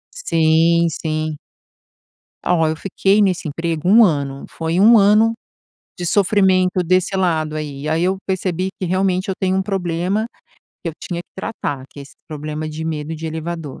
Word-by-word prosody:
Sim, 165 - +3
sim. 155 -1 -3 1.1
Ah 180 - +3
ó, 165 -2 +2
eu 155 - -1
fiquei 195 +4 +1
nesse 185 -5 +1
emprego 165 +2 -3
1 225 +4 +7
ano. 140 -7 0
Foi 165 +1 -3
1 220 +4 +7
ano 215 +3 +4 0.6
de 180 - -5
sofrimento 185 -1 +3
desse 185 +3 +1
lado, 160 -5 0
aí. 150 -1 -5
Aí 160 +2 +1
eu 190 +2 +1
percebi 185 -1 -1
que, 185 - -2
realmente, 185 +1 0
eu 190 - -1
tenho 190 0 +1
um 190 - +2
problema 190 +1 -1 0.6
que 170 - -3
eu - - -4
tinha 170 -2 -4
que - - -55
tratar, 145 -9 -4
que 145 - -12
é - - -7
esse 140 - -15
problema 155 0 -5
de 155 +1 -6
medo 155 0 -3
de 160 +1 -8
elevador. 160 -2 -5
170 Hz, 175 wpm, -19 LUFS, 155-190 Hz, 1.1 s, 1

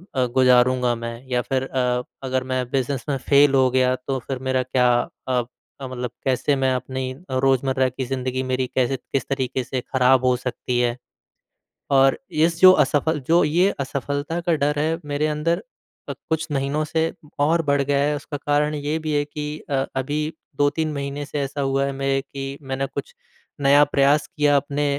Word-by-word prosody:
अ, 130 - +2
गुज़ारूँगा 125 -1 +4
मैं 115 +1 -7
या 125 -1 +1
फिर 130 +1 -1
अ, 125 -2 -1 0.2
अगर 130 -1 -1
मैं 130 0 +1
बिज़नेस 135 -1 -1
में 135 - 0
फेल 140 0 +6
हो 130 -1 +4
गया 130 0 +3
तो 135 -1 0
फिर 130 -2 -3
मेरा 130 -1 +1
क्या 125 0 +2 0.4
अ, 125 -1 +2 0.4
मतलब 125 -2 -5
कैसे 135 +2 +1
मैं 130 0 +3
अपनी 130 +1 -4 0.3
रोज़मर्रा 130 0 +2
की 130 +1 -5
ज़िंदगी 130 0 -2
मेरी 130 0 -1
कैसे 130 +1 +1
किस 130 +1 -4
तरीके 130 -1 -1
से 130 -2 -3
ख़राब 130 0 +3
हो 125 -1 +4
सकती 125 -1 -3
है। 120 0 +1 1.0
और 135 0 +5 0.3
इस 165 0 0
जो 185 - +11
असफल 150 +2 0
जो 170 +2 +5
ये 175 +6 +3
असफलता 145 +4 -3
का 170 -1 +1
डर 145 +1 0
है 160 +2 0
मेरे 145 +1 0
अंदर 165 +3 0 0.5
अ, - - 0
कुछ 160 0 -3
महीनों 140 +3 0
से 160 +2 -1 0.4
और 165 +1 +2
बढ़ 140 -1 +2
गया 140 0 +1
है 145 +1 +1
उसका 145 0 -6
कारण 150 +1 +2
ये 150 +2 -2
भी 155 -1 -3
है 145 0 +2
कि 150 +1 -6
अ, 135 -1 +1
अभी 145 +3 -1 0.3
2-3 150 +2 +1
महीने 140 +1 -4
से 145 0 -4
ऐसा 140 +1 -4
हुआ 135 0 +1
है 140 - -2
मेरे 135 0 +1
कि 135 0 -7
मैंने 135 0 -2
कुछ 485 - -5 0.5
नया 140 +1 +5
प्रयास 145 +1 +2
किया 145 -1 +3
अपने 145 +1 -1
135 Hz, 185 wpm, -22 LUFS, 130-145 Hz, 1.0 s, जो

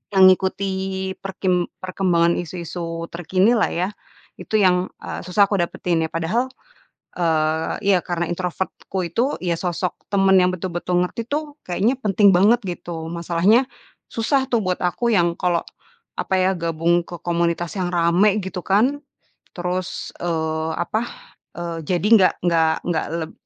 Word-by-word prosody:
mengikuti 190 0 +2
perkim 185 -2 -1 0.2
perkembangan 175 -2 +2
isu-isu 170 -1 -5
terkinilah, 190 +7 +2
ya. 180 +3 -1 0.5
Itu, - - -4
yang, 185 -2 +3 0.2
eee, - - -5
susah 195 +3 +4
aku 200 - +1
dapetin, 170 -1 0
ya. - - -5
Padahal, 180 +10 0 0.7
eee 160 -2 +1 0.2
iya, 185 - +4
karena 175 -1 -2
introvert-ku 180 +2 -4
itu 235 - 0
iya, 175 -2 +1
sosok 180 0 -2
teman 195 -1 +3
yang 180 -1 +4
betul-betul 180 0 -2
ngerti 230 +5 -5
tuh, 295 0 -3
kayaknya 195 +7 +1
penting 205 -3 +4
banget, 210 +6 +5
gitu. 170 -2 -5
Masalahnya, 170 +8 +2 0.5
susah 265 +4 +1
tuh, 235 -2 +2
buat 180 -1 0
aku 180 +7 0
yang 175 -4 +3
kalau, 175 -2 +1 0.6
apa 190 - -1
ya, 185 +1 +3
gabung 170 +1 +1
ke 175 - -8
komunitas 170 0 0
yang 180 -1 -1
ramai, 175 +5 +3
gitu 190 -1 -5
kan. 245 +9 +2 0.6
Terus, 180 +1 -3
eee, 160 -2 -1
apa, 215 +5 -1 0.6
eee, 170 -1 -4
jadi 180 +4 0
nggak 190 -4 +5
nggak 165 -2 +3
nggak 170 -2 0 0.2
leb 160 +1 -5
180 Hz, 140 wpm, -21 LUFS, 170-195 Hz, 0.7 s, banget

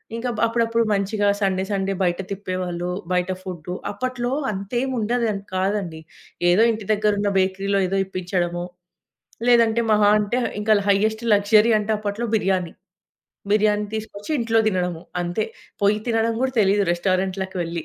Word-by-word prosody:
ఇంకా 245 +2 -3
బ్ - - -4
అప్పుడప్పుడు 230 0 +1
మంచిగా 205 +1 +1
సండే, 190 -1 +1
సండే 195 0 0
బయట 175 +1 0
తిప్పేవాళ్లు. 185 -3 -3 0.2
బయట 180 +1 0
ఫుడ్డు. 180 -2 -6 0.2
అప్పట్లో 245 +3 -3 0.2
అంతేముండదు 240 +3 -1
అని 200 -1 -5
కాదండి. 190 -4 -1 0.5
ఏదో 195 +6 +5
ఇంటి 215 -2 -5
దగ్గరున్న 205 -1 +1
బేకరీలో 195 +1 +1
ఏదో 195 +1 -1
ఇప్పించడమో, 175 -2 -2 0.9
లేదంటే 235 -1 +4
మహా 210 -1 +5
అంటే 210 +4 -1 0.2
ఇంకా 215 +1 +3 0.2
హయ్యెస్ట్ 220 +3 +2
లగ్జరీ 210 +3 +4
అంటే 210 +1 -2
అప్పట్లో 210 +3 -3
బిర్యానీ. 185 -4 0 0.8
బిర్యానీ 210 0 +2
తీసుకొచ్చి 215 +3 -5
ఇంట్లో 225 -1 +2
తినడము. 180 -3 -2 0.2
అంతే. 175 +5 -1 0.4
పోయి 205 +1 +3
తినడం 225 0 +1
కూడా 265 -1 0
తెలీదు 200 0 +3
రెస్టారెంట్లకి 185 +1 -1
వెళ్లి. 165 -1 -4
200 Hz, 135 wpm, -22 LUFS, 185-220 Hz, 0.9 s, ఏదో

